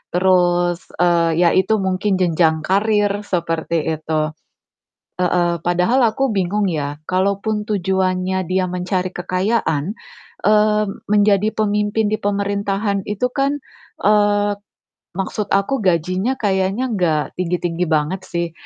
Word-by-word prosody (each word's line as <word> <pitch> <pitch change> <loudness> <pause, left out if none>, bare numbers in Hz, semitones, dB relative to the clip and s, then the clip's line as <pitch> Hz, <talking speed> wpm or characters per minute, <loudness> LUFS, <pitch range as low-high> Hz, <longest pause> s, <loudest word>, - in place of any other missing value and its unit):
terus, 175 -1 +2 0.2
eee, 170 -1 +2
ya 170 - +5
itu 190 +4 +2
mungkin 190 +1 0
jenjang 165 -3 +2
karir, 205 +2 +1
seperti 165 -2 -1 0.2
itu. 155 -1 -1 0.9
Heeh, 175 -2 +1
Padahal 180 +10 +2
aku 260 +2 -1
bingung 200 +2 0
ya, 145 -2 -3
kalaupun 200 +3 0
tujuannya 190 -1 0
dia 185 0 +1
mencari 180 +1 -2
kekayaan, 185 -2 -1 0.5
eee, 210 0 +3 0.2
menjadi 210 0 +3
pemimpin 210 0 0
di 215 - 0
pemerintahan 200 -1 -1
itu 210 +5 -1
kan 275 +2 -1 0.4
eee, 205 0 +2 0.6
maksud 200 +2 -3
aku 215 +7 0
gajinya 185 +6 0
kayanya 200 +3 0
gak 160 -6 0
tinggi-tinggi 175 -1 -1
banget 155 +4 0
sih. 170 -1 -3
190 Hz, 115 wpm, -19 LUFS, 175-210 Hz, 0.9 s, ya